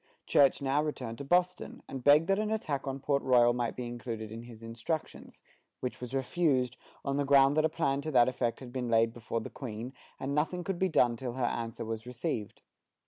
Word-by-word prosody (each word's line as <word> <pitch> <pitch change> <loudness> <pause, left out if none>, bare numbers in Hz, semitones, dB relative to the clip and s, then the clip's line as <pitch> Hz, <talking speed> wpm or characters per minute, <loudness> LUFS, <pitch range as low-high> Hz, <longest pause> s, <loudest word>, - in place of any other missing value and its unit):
Church 140 -1 +4
now 140 +2 +2
returned 125 -7 -4
to - - -4
Boston, 180 +5 0
and 135 -2 -6
begged 145 +4 +6
that 195 +1 +2
an 215 0 0
attack 155 -11 -2
on 135 0 -3
Port 140 0 +1
Royal 120 -2 +5
might 120 -1 -2
be 125 - -4
included 115 -2 -5
in 115 +1 -6
his 115 -1 -12
instructions, 115 +8 -5 0.4
which 125 -1 -4
was 125 +2 -5
refused, 135 -3 +1 0.3
on 140 0 0
the 145 - +2
ground 140 0 +5
that 155 0 +3
a - - +3
plan 140 -2 0
to 155 - -4
that 125 -5 +5
effect 125 -1 -1
had 125 -2 -9
been 125 -2 -2
laid 115 0 +3
before 115 -1 -3
the - - -7
Queen, 120 0 -6 0.3
and 135 - -3
that 150 +1 +3
nothing 180 +3 -4
could 185 -1 -3
be 190 - +2
done 120 -7 +3
till 120 0 -5
her 130 -1 -1
answer 115 -1 -3
was 110 +1 -5
received. 115 -4 -4
130 Hz, 220 wpm, -31 LUFS, 120-145 Hz, 0.4 s, begged